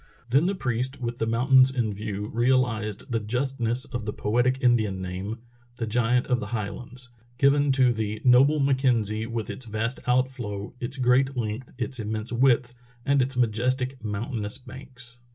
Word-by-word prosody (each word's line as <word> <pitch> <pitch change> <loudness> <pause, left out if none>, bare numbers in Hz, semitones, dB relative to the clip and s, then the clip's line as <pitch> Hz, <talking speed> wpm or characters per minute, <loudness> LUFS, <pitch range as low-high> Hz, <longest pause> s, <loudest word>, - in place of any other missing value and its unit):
Then 140 +7 +4
the 200 - 0
priest, 130 -3 -1
with 120 -1 -4
the 115 - -1
mountains 130 +3 +5
in 120 -5 -1
view, 105 0 -4
realized 120 -3 0
the 115 - +1
justness 125 +2 -1
of 120 -3 -6
the - - 0
poetic 120 +4 +1
Indian 110 -7 +2
name, 95 +4 -5 0.4
the 120 - -3
Giant 120 +2 +1
of 125 -2 +1
the 105 - -5
Highlands, 120 +3 -5 0.3
given 140 +1 +3
to 130 -2 +4
the 110 -1 -3
"noble 135 +5 +5
Mackenzie, 120 -6 +1
with 115 -2 -4
its 125 - -2
vast 115 +3 -1
outflow, 125 -5 -1
its 125 +3 -4
great 130 +1 +2
length, 115 +2 -4
its 130 0 -2
immense 110 +1 -2
width, 125 0 +3 0.3
and 140 0 +3
its 130 0 0
majestic 125 +2 0
mountainous 105 +1 -3
banks." 125 -1 -12
120 Hz, 160 wpm, -25 LUFS, 110-130 Hz, 0.4 s, mountains